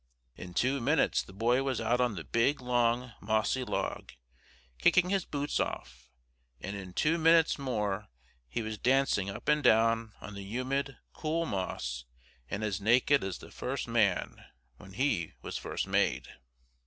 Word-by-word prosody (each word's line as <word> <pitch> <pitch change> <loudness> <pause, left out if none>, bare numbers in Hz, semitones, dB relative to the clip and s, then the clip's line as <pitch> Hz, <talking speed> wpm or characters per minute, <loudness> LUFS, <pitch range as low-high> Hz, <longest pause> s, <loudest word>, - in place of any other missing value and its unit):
In 90 -1 -9
two 135 +6 +2
minutes 145 +5 +2
the - - -12
boy 115 +6 +2
was 135 -2 -1
out 120 +2 +1
on 120 -4 +1
the 85 - -5
big, 120 - +1
long, 120 0 +1
mossy 110 +5 +1
log, - - -3 0.7
kicking 180 - +4
his 195 -2 +1
boots 145 0 -2
off, 65 +1 -4 0.5
and 100 +1 -5
in 95 -2 -8
two 160 - +2
minutes 165 -1 +4
more 105 -6 -2 0.4
he 90 - -2
was 110 -1 -5
dancing 130 -6 +2
up 100 - -8
and 150 0 +3
down 115 0 +3
on 105 - -9
the 100 - -7
humid, 130 +7 -2 0.2
cool 165 +2 -1
moss, 65 - -3 0.4
and 100 +2 -3
as 100 -2 -2
naked 125 +6 +4
as 95 -1 -3
the - - -13
first - - -4
man, - - +1 0.3
when 95 +6 -13
he 105 - 0
was - - -4
first - - -3
made. - - +1
115 Hz, 160 wpm, -31 LUFS, 100-135 Hz, 0.7 s, kicking